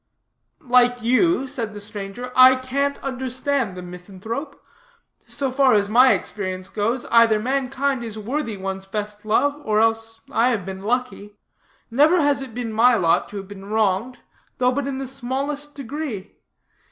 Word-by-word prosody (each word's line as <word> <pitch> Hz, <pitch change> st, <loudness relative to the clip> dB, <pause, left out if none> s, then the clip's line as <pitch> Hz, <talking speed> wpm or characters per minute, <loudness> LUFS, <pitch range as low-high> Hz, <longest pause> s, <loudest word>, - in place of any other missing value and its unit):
"Like 245 Hz, -1 st, +3 dB
you," 265 Hz, +5 st, +3 dB
said 230 Hz, -5 st, -5 dB
the -, -, -6 dB
stranger, 205 Hz, +4 st, -6 dB
"I 255 Hz, 0 st, +8 dB
can't 275 Hz, +2 st, -1 dB
understand 260 Hz, -4 st, -2 dB
the 180 Hz, -, -7 dB
misanthrope. 195 Hz, -, -7 dB, 0.7 s
So 270 Hz, -2 st, -3 dB
far 265 Hz, -2 st, +4 dB
as 205 Hz, 0 st, +1 dB
my 250 Hz, +3 st, +7 dB
experience 185 Hz, -2 st, -4 dB
goes, 230 Hz, +4 st, -1 dB
either 230 Hz, -2 st, +5 dB
mankind 270 Hz, +1 st, -1 dB
is 220 Hz, -2 st, -6 dB
worthy 230 Hz, 0 st, -3 dB
one's 190 Hz, 0 st, -5 dB
best 210 Hz, +1 st, -5 dB
love, 285 Hz, +7 st, +1 dB
or 215 Hz, -1 st, +1 dB
else 225 Hz, 0 st, 0 dB
I 235 Hz, +2 st, +3 dB
have 215 Hz, -7 st, -1 dB
been 190 Hz, 0 st, -6 dB
lucky. 220 Hz, -2 st, -3 dB, 0.6 s
Never 300 Hz, +9 st, +4 dB
has 285 Hz, -2 st, +2 dB
it 255 Hz, -4 st, -8 dB
been 240 Hz, -3 st, -4 dB
my 240 Hz, +3 st, +5 dB
lot 170 Hz, -6 st, +2 dB
to 205 Hz, -, -8 dB
have 195 Hz, -1 st, -7 dB
been 195 Hz, -1 st, -10 dB
wronged, 215 Hz, +3 st, 0 dB, 0.4 s
though 250 Hz, -1 st, +3 dB
but 275 Hz, +1 st, -2 dB
in 270 Hz, -1 st, -3 dB
the 270 Hz, -, -4 dB
smallest 275 Hz, +3 st, -4 dB
degree. 275 Hz, -6 st, -6 dB
240 Hz, 160 wpm, -22 LUFS, 210-265 Hz, 0.7 s, I